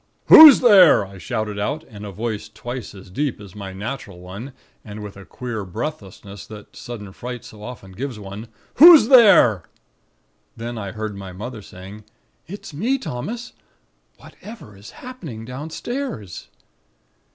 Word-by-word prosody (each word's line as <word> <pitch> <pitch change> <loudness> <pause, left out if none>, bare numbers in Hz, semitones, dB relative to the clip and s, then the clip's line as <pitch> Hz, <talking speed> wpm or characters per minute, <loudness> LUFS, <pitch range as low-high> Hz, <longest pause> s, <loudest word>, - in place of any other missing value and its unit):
"'Who's 310 -3 +10
there?' 195 - +6
I 95 0 -13
shouted 105 +3 -4
out, 145 +10 -3
in 105 -8 -12
a 100 - -7
voice 110 +1 -5
twice 120 +1 -8
as 95 -1 -14
deep 140 +4 -3
as 100 -3 -13
my 100 -2 -8
natural 100 -1 -7
one, 100 +9 -10 0.3
and 105 0 -9
with 105 -1 -9
a 95 0 -13
queer 120 -4 -6
breathlessness, 100 - -8
that 105 -1 -13
sudden 110 -6 -9
fright 125 +1 -8
so 105 - -13
often 105 -4 -10
gives 125 +4 -6
one. 100 +2 -9 0.3
'Who's 315 -7 +9
there?' 205 - +6 1.0
"Then 120 +1 -6
I 100 -4 -6
heard 110 -1 -5
my 95 -2 -9
mother 110 +4 -8
saying: 95 +3 -12 0.4
"'It's 195 -3 -10
me, 230 - -1
Thomas. 235 - -7 0.6
Whatever 210 - -13
is 100 +1 -13 0.2
happening 160 - -9
downstairs?' 150 - -7
110 Hz, 145 wpm, -21 LUFS, 100-145 Hz, 1.0 s, Who's